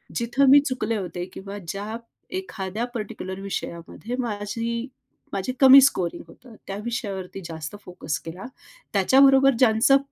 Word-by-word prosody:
जिथं 260 +4 +2
मी 285 +1 +9
चुकले 230 -4 -1
होते 175 -2 -5
किंवा 200 +1 -8
ज्या 205 +3 -4 0.4
एखाद्या 215 - -4
पर्टिक्युलर 195 -3 -5
विषयामध्ये 195 +4 -5
माझी 230 +2 -3 0.5
माझी 200 +6 -2
कमी 270 0 +9
स्कोरिंग 185 -10 +1
होतं 230 +7 -16
त्या 195 0 -4
विषयावरती 195 -5 -4
जास्त 160 +3 -7
फोकस 165 -3 -4
केला. 175 +4 -8 0.5
त्याच्याबरोबर 270 +6 +5
ज्यांचं 250 +3 +5
215 Hz, 125 wpm, -24 LUFS, 190-250 Hz, 0.5 s, मी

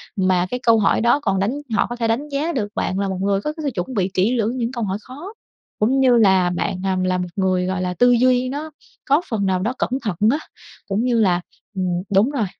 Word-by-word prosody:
mà 185 -2 +2
cái 250 - -2
câu 230 -1 +5
hỏi 200 - +2
đó 235 +5 +3
còn 195 -9 0
đánh 200 +4 +1 0.2
họ 210 - +2
có 240 - -4
thể 235 -1 -1
đánh 250 +7 -1
giá 290 +4 -1
được 215 -6 -1
bạn 190 - -1
là 200 - 0
một 190 -1 -3
người 195 0 +1
có 300 - -3
cái 315 0 -8
sự 290 - 0
chuẩn 180 +8 -3
bị 195 -4 0
kĩ 205 +7 +2
lưỡng 230 +3 -1
những 235 -1 -2
câu 240 -3 -4
hỏi 195 -1 -2
khó, 295 - -10 0.5
cũng 250 +6 +2
như 255 -2 +5
là 190 -5 +4
bạn, 180 +1 -2
à, 190 -1 0
là 185 0 +1
một 180 0 -3
người, 185 -2 +1
gọi 185 0 -2
là, 180 0 -2
tư 245 +7 +4
duy 250 +1 +3
nó 300 +4 -5 0.3
có 285 +3 +3
phần 215 -5 -1
nào 190 -1 +1
đó 220 +7 -1
cẩn - - -1
thận 210 -6 -2 0.2
á, 285 - +1 0.5
cũng 200 +3 -1
như 245 -2 +1
là 180 -5 +2 0.3
ừm, 190 -1 -1 0.3
đúng 205 +7 +4
rồi. 260 -7 0
220 Hz, 255 wpm, -21 LUFS, 190-255 Hz, 0.5 s, câu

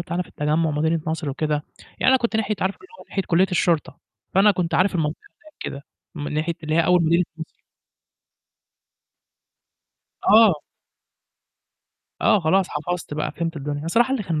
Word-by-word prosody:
بتاعنا 175 +1 -2
في - - -17
التجمُّع، 155 +2 0
مدينة 160 +2 0
نصر 160 -2 -2
وكده، 150 +1 -1 0.4
يعني - - +3
أنا 260 - +6
كنت 235 -3 -1
ناحية 220 -1 0
عارفة 190 +1 0
اللي 385 - -16
هو - - -13
ناحية 195 - -2
كُلّية 180 +3 +3
الشرطة، 170 -3 0 0.4
فأنا 200 +2 +6
كنت 180 -4 -1
عارف 185 +1 +2
المنطقة 155 -2 -1 0.2
هناك 310 - -18
كده، 140 - -6 0.3
من 150 -1 -5
ناحية 160 +2 -1
اللي 155 0 -2
هي 165 0 +3
أول 180 -1 +4
مدينة 170 +2 +3
نصر. 160 - -9 2.7
آه. 220 -2 +7 1.7
آه، 210 - +4
خلاص 185 +3 +2
حفظت 160 +1 -4
بقى 155 - -2
فهمت 165 -1 -3
الدنيا، 145 0 -4
أنا 160 - -5
صراحة 240 +7 +3
اللي 255 - 0
كان 165 -5 -2
170 Hz, 165 wpm, -23 LUFS, 155-190 Hz, 2.7 s, آه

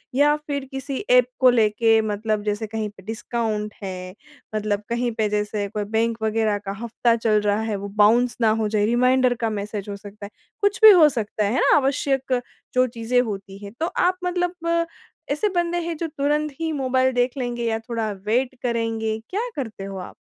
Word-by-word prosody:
या 295 +2 +4
फ़िर 290 -2 -4
किसी 270 0 -4
ऐप 250 0 +7
को 255 -1 +7
लेके 225 -1 +3
मतलब 215 0 -2
जैसे 210 +1 -2
कहीं 220 -1 -3
पे 195 -2 -17
डिस्काउंट 220 -1 -3
है। 185 0 -6 0.4
मतलब 210 -1 -1
कहीं 240 0 0
पे 220 -2 0
जैसे 210 0 -1
कोई 210 +1 -3
बैंक 230 0 +1
वग़ेेरह 220 -1 +1
का 195 - -3
हफ़्ता 235 0 +1
चल 220 -2 +2
रहा 205 0 +1
है 220 -1 -2
वो 200 0 -5 0.2
बाउंस 240 +3 +3
ना 225 - +5
हो 215 - +1
जाए? 210 -1 +1
रिमाइंडर 250 +2 +3
का - - +1
मैसेज 205 -1 -4
हो 200 - -4
सकता 205 +1 -10
है? 200 - -9 0.3
कुछ 405 -1 +1
भी 435 - +12
हो 330 -6 +7
सकता 215 -4 -2
है। 205 - 0
है - - +1
ना? - - +5
आवश्यक 270 -2 0 0.3
जो 255 0 +4
चीज़ें 235 +1 0
होती 195 -4 -6
हैं 200 - -8
तो 325 - +1 0.2
आप 365 0 +2
मतलब 350 -2 0 0.5
ऐसे 410 +9 +1
बंदे 345 0 +1
हैं 335 - -2
जो 330 +1 -2
तुरंत 295 +1 -1
ही 325 -1 -1
मोबाइल 260 -2 +1
देख 245 0 +2
लेंगे 240 -2 -3
या 225 -1 0
थोड़ा 225 -2 -3
वेट 250 +4 +1
करेंगे, 225 -2 -1
क्या 450 +6 -2
करते 225 -7 -5
हो 195 0 -6
आप? 180 - -8
230 Hz, 200 wpm, -23 LUFS, 210-265 Hz, 0.5 s, भी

